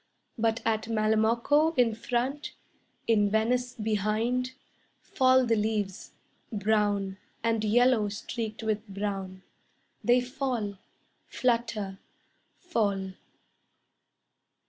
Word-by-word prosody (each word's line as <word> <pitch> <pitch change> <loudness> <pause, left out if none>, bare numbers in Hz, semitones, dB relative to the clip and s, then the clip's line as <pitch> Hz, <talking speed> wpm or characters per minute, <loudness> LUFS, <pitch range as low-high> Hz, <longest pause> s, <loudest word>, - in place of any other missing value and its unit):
But 225 -1 0
at 220 0 0
Malamocco 230 +8 +2
in 240 -3 +4
front, 250 +6 -2 0.5
In 210 -3 +3
Venice 245 +4 +1
behind, 220 +4 0 0.5
Fall 260 0 +4
the 230 -1 +2
leaves, 210 -3 -2 0.4
Brown, 205 -2 +1 0.3
And 225 -1 +1
yellow 230 0 +3
streaked 220 +1 -5
with 215 0 -1
brown. 195 -2 -4 0.6
They 245 +1 +5
fall, 245 -6 -3 0.5
Flutter, 230 -6 -1 0.6
Fall. 200 - -1
220 Hz, 85 wpm, -28 LUFS, 210-245 Hz, 0.6 s, They